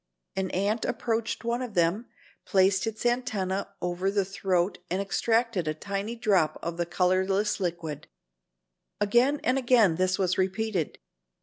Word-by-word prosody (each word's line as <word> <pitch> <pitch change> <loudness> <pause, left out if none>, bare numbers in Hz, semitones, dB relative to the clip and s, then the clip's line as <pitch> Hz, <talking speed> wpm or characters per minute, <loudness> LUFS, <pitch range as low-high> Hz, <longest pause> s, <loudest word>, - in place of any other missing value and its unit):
An 190 -1 -1
ant 205 +5 0
approached 230 -1 -2
one 235 +2 -1
of 240 -5 -6
them, 175 +7 +1 0.4
placed 190 +1 +3
its 225 +1 -4
antennae 210 -6 0 0.2
over 180 +2 0
the 200 -1 +1
throat 190 -2 0
and 185 - -1
extracted 210 -1 0
a 155 - -1
tiny 200 +6 -4
drop 190 -9 +2
of 170 0 -3
the 175 -1 -1
colorless 190 +4 +1
liquid. 165 -5 -4 0.9
Again 240 +8 +3
and 255 +2 +2
again 235 -9 +4
this 185 +1 +1
was 185 -2 0
repeated. 190 -2 -1
195 Hz, 140 wpm, -27 LUFS, 185-225 Hz, 0.9 s, again